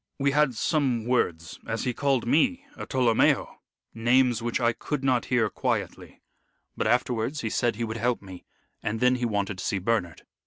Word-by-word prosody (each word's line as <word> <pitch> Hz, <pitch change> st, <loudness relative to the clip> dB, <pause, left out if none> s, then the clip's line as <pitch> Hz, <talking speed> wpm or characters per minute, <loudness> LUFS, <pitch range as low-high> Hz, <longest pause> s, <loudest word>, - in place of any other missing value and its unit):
We 140 Hz, 0 st, +1 dB
had 145 Hz, -3 st, +2 dB
some 125 Hz, -3 st, 0 dB
words, 85 Hz, -10 st, -1 dB
as 115 Hz, -, -2 dB
he 125 Hz, -, -1 dB
called 135 Hz, -2 st, 0 dB
me 260 Hz, -, +2 dB
a -, -, -7 dB
Tolomeo 125 Hz, -4 st, +2 dB, 0.4 s
names 120 Hz, +1 st, +2 dB
which 120 Hz, 0 st, -1 dB
I 120 Hz, -1 st, +2 dB
could 145 Hz, +3 st, -4 dB
not 130 Hz, -3 st, +2 dB
hear 120 Hz, -3 st, +2 dB
quietly. -, -, -4 dB, 0.5 s
But -, -, -1 dB
afterwards 125 Hz, +3 st, 0 dB
he 110 Hz, -, -3 dB
said 120 Hz, -3 st, +1 dB
he 115 Hz, -, -3 dB
would 110 Hz, 0 st, -4 dB
help 120 Hz, +2 st, 0 dB
me, 95 Hz, -2 st, -11 dB, 0.4 s
and 110 Hz, +1 st, -2 dB
then 125 Hz, +1 st, +3 dB
he 125 Hz, -, -1 dB
wanted 100 Hz, -3 st, -2 dB
to -, -, -5 dB
see 100 Hz, -, -1 dB
Bernard. 95 Hz, -5 st, -1 dB
120 Hz, 185 wpm, -26 LUFS, 110-130 Hz, 0.5 s, then